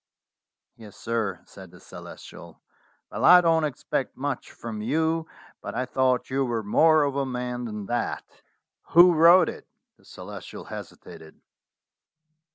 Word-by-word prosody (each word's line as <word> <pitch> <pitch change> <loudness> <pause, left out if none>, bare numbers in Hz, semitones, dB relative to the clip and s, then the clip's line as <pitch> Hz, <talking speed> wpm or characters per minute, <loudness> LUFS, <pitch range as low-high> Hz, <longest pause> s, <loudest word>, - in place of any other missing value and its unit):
"Yes, 110 -3 -14
sir," 110 -5 -3
said 95 -2 -14
the 90 +1 -17
Celestial. - - -12 0.5
"Well, - - -5
I 180 - +8
don't 165 -2 +2
expect 145 -5 -4
much - - -4
from 110 -2 -8
you, 160 +7 -1 0.3
but - - -7
I 125 +2 -1
thought 130 0 0
you 135 +1 0
were 120 -3 -2
more 155 +9 +4
of 140 -1 -2
a 140 - 0
man 125 -1 -4
than 105 -3 -6
that. 120 +2 -3 0.7
Who 175 +1 +7
wrote 170 +2 +6
it?" - - -8 0.3
The - - -27
Celestial - - -10
hesitated. 80 0 -11
125 Hz, 140 wpm, -25 LUFS, 115-160 Hz, 0.7 s, I